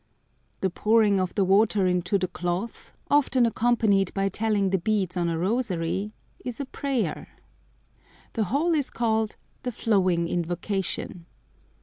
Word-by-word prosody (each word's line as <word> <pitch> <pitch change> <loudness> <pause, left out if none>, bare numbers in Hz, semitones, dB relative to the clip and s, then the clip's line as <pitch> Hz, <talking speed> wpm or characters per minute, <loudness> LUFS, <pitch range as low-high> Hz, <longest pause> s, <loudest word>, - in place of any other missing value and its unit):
The 190 - +1
pouring 210 0 +3
of 185 -1 -2
the 195 - +2
water 200 +1 +3
into 180 +2 +1
the 185 -1 -1
cloth, 175 +5 -4 0.2
often 270 -4 +4
accompanied 220 -4 +2
by 195 0 +1
telling 205 -1 0
the 190 - +2
beads 195 -1 0
on 175 -1 0
a 165 - -1
rosary, 195 -1 -1 0.3
is 245 0 -5
a 280 - -2
prayer. 265 -2 -2 1.1
The 220 -3 0
whole 295 - +1
is 290 -4 0
called 220 -2 0 0.3
"The 250 - -3
Flowing 185 -7 +1
Invocation." 175 0 -3
200 Hz, 135 wpm, -26 LUFS, 180-230 Hz, 1.1 s, often